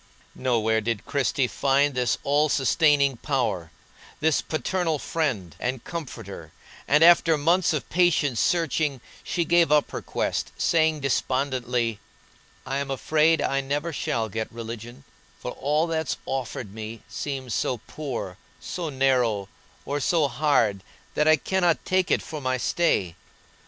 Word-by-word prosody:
Nowhere 110 -3 +1
did 110 -1 -2
Christie 135 -1 +1
find 140 +2 +2
this 125 -2 +1
all 145 +2 +2
sustaining 140 -1 +3
power, 120 - -1 0.5
this 160 0 +2
paternal 165 0 -1
friend, 125 - -2
and 125 -1 -3
comforter, 170 -5 -7 0.4
and 150 +3 +5
after 170 -1 +6
months 170 +5 +3
of 155 -4 -2
patient 160 -8 +2
searching 155 -3 +1 0.2
she 170 - -1
gave 170 -2 +4
up 150 -1 +3
her - - -4
quest, - - -2
saying, 160 -2 +2
despondently: 125 -4 0 0.7
"I'm 135 +1 -2
afraid 155 +3 +2
I 140 0 +1
never 145 +5 -2
shall 115 -5 -1
get 110 +1 -4
religion, 115 +1 -8 0.3
for - - -6
all 150 +4 0
that's 160 -3 -2
offered 125 -5 -4
me 110 +1 -7
seems 135 -5 -4
so 125 - 0
poor, 125 - -5 0.2
so 170 -3 -4
narrow, 125 -7 +1 0.4
or 145 +1 -2
so 155 +1 +2
hard 125 -7 +1 0.3
that 150 - +1
I 155 - +7
cannot 175 +2 0
take 185 0 +1
it - - +2
for 155 -2 -7
my 130 -1 0
stay. 120 - +1
140 Hz, 135 wpm, -25 LUFS, 120-155 Hz, 0.7 s, I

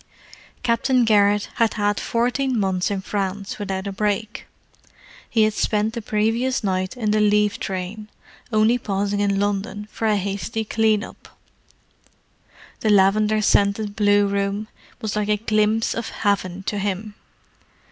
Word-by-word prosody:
Captain 245 +1 +2
Garrett 205 -1 +3
had 230 -2 +2
had 205 -1 0
fourteen 245 +1 0
months 190 -1 0
in 200 -2 -2
France 200 0 -3
without 190 -1 -3
a 200 - -3
break. 210 +2 -2 0.8
He 220 - +3
had 215 0 +2
spent 215 +1 0
the 235 - -4
previous 225 +5 0
night 185 +3 -1
in 215 -4 0
the 215 0 +2
leave 210 0 +2
train, 195 +3 -5 0.4
only 220 +3 +3
pausing 205 -2 -1
in 200 -1 +1
London 205 +1 -2
for 225 - -2
a 215 - +3
hasty 200 +3 -3
"clean 220 -1 +2
up." - - -13 1.4
The 220 - 0
lavender 210 +2 +3
scented 205 +1 +2
blue 205 -2 +4
room 200 +1 -1 0.3
was 215 -1 -3
like 210 0 -1
a 210 - +3
glimpse 215 +1 +1
of 230 -1 -4
Heaven 195 -3 -1
to 205 +1 -2
him. 205 +1 -3
210 Hz, 145 wpm, -22 LUFS, 200-220 Hz, 1.4 s, blue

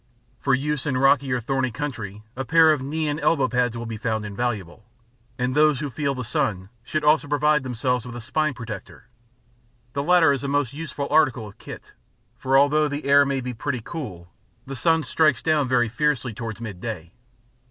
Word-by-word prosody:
For 135 -1 +2
use 150 +1 -2
in 130 -3 0
rocky 135 0 +3
or 125 - +1
thorny 130 +2 -1
country, 115 -5 -6
a 135 - -3
pair 160 +3 +5
of 145 - -3
knee 155 +3 -2
and 150 +1 -1
elbow 140 -6 +2
pads 125 -2 0
will 115 - -5
be 115 -1 -5
found 110 -1 -2
invaluable, 105 -3 -4 0.5
and 125 +1 -1
those 150 -1 +4
who 145 -2 -4
feel 140 0 -1
the 125 - -4
sun 100 -5 -1
should 155 +5 -2
also 150 0 +4
provide 150 +1 +2
themselves 125 -1 -1
with 125 -1 -8
a - - -5
spine 155 +5 -1
protector. 110 -2 -9 0.8
The 140 - -1
latter 165 0 +5
is 140 - -3
a - - -2
most 140 -2 0
useful 145 -2 -5
article 135 -7 +3
of 100 - -15
kit, - - -10 0.4
for 135 +1 +2
although 150 +2 +4
the 145 0 -5
air 140 0 +5
may 135 -1 -1
be 125 0 -4
pretty 130 +2 -3
cool, 95 - -7 0.3
the 135 - -6
sun 160 +4 +2
strikes 155 -7 +2
down 155 -4 +2
very 125 -2 +2
fiercely 130 0 -1
towards 110 0 -6
midday. 100 -5 -6
135 Hz, 195 wpm, -24 LUFS, 120-150 Hz, 0.8 s, pair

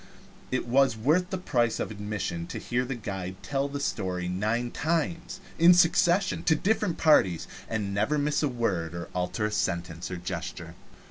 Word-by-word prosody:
It 130 - 0
is 130 -2 +3
worth 160 +11 +2
the 190 - -2
price 120 -10 0
of - - -2
admission 100 -5 -4
to - - -6
hear 125 +1 -1
the 135 +1 -3
guide 95 -5 -5
tell 140 0 -1
the 140 0 -5
story 95 -9 -2
nine 110 +6 -1
times 165 +3 -2 0.2
in 175 +2 +8
succession 175 +2 +3
to 160 - +4
different 205 0 0
parties, 95 - +4 0.2
and 105 -3 -2
never 110 +10 +1
miss 145 0 +1
a 150 - +2
word 95 - -1
or 85 - -6
alter 90 +3 -1
a 105 - -1
sentence 85 -4 -2
or 90 - -4
a - - -6
gesture. 90 +1 -6
120 Hz, 180 wpm, -27 LUFS, 95-150 Hz, 0.2 s, in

